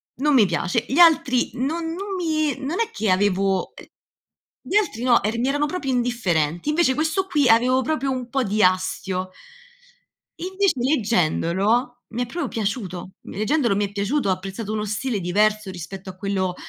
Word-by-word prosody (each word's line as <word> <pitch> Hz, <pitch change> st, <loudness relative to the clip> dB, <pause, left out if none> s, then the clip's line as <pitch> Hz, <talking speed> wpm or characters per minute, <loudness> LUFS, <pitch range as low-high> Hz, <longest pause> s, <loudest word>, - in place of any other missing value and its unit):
non 295 Hz, +3 st, +1 dB
mi 230 Hz, -6 st, +6 dB
piace." 180 Hz, +6 st, -1 dB
Gli 275 Hz, -, -1 dB
altri 290 Hz, -7 st, +5 dB
non 325 Hz, +6 st, -2 dB
non 390 Hz, +2 st, -5 dB
mi 310 Hz, -5 st, 0 dB
non 295 Hz, +8 st, -3 dB
è 460 Hz, -, -1 dB
che 215 Hz, -, 0 dB
avevo 195 Hz, 0 st, +1 dB
ehm, -, -, -12 dB, 0.8 s
gli -, -, -4 dB
altri 390 Hz, -, +1 dB
no, 245 Hz, -2 st, +4 dB
eran 220 Hz, +2 st, -1 dB
mi 255 Hz, -, +1 dB
erano 290 Hz, +1 st, +1 dB
proprio 295 Hz, -4 st, -3 dB
indifferenti. 200 Hz, -, 0 dB
Invece 305 Hz, -3 st, +3 dB
questo 320 Hz, +5 st, 0 dB
qui 295 Hz, -8 st, +2 dB
avevo 250 Hz, +3 st, +4 dB
proprio 275 Hz, -1 st, -1 dB
un 255 Hz, -2 st, -3 dB
po' 270 Hz, +1 st, 0 dB
di 215 Hz, 0 st, 0 dB
astio 185 Hz, 0 st, 0 dB, 1.1 s
invece 380 Hz, +1 st, +1 dB
leggendolo, 230 Hz, -, +1 dB
mi 240 Hz, +2 st, -2 dB
è -, -, -4 dB
proprio 300 Hz, +3 st, -4 dB
piaciuto, 195 Hz, -5 st, -4 dB
mhmm, -, -, -11 dB
leggendolo 235 Hz, 0 st, +1 dB
mi 205 Hz, +1 st, +1 dB
è -, -, -15 dB
piaciuto, 205 Hz, +5 st, -1 dB
ho -, -, +4 dB
apprezzato 195 Hz, +3 st, -4 dB
uno 215 Hz, 0 st, -2 dB
stile 215 Hz, +1 st, -2 dB
diverso 210 Hz, +3 st, +1 dB
rispetto 190 Hz, +2 st, -8 dB
a 185 Hz, -, -9 dB
quello, 190 Hz, -2 st, -2 dB
235 Hz, 175 wpm, -22 LUFS, 195-290 Hz, 1.1 s, mi